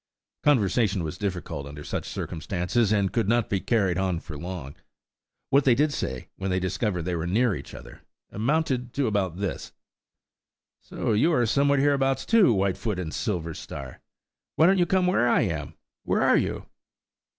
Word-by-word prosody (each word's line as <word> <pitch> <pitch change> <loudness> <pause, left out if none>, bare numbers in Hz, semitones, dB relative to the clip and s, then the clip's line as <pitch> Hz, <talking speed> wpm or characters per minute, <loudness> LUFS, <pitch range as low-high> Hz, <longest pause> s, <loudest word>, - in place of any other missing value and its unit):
Conversation 105 - +2
was 80 +3 -5
difficult 90 -8 -4
under 75 +1 -9
such - - -4
circumstances, 95 +6 -1
and 100 -3 +1
could 115 -4 +1
not 120 -1 +1
be 100 - +1
carried 95 -5 +1
on 95 -3 0
for 80 -2 -9
long. 85 -3 -6 0.8
What 140 +1 +5
they 125 -3 +4
did 145 +3 +2
say, 65 0 -4
when 95 0 -3
they 95 0 +1
discovered 95 0 -1
they 90 +1 -2
were 85 0 -2
near 110 +4 +2
each - - -8
other, - - -12 0.3
amounted 125 +1 -1
to 140 - 0
about 100 -6 -1
this:– 100 -1 -4 1.1
"So - - -3
you 135 +11 +3
are 120 -5 +3
somewhere 140 +5 +2
hereabouts, 135 -1 +2
too, 220 - +5
Whitefoot 100 0 0
and 85 -4 -4
Silverstar. 80 - -5 0.6
Why 160 - +5
don't 190 +2 +4
you 175 - +3
come 185 +1 +2
where 150 -10 +2
I - - +4
am? 80 -9 -3 0.3
Where - - +1
are - - +5
you?" - - -2
100 Hz, 170 wpm, -26 LUFS, 90-125 Hz, 1.1 s, What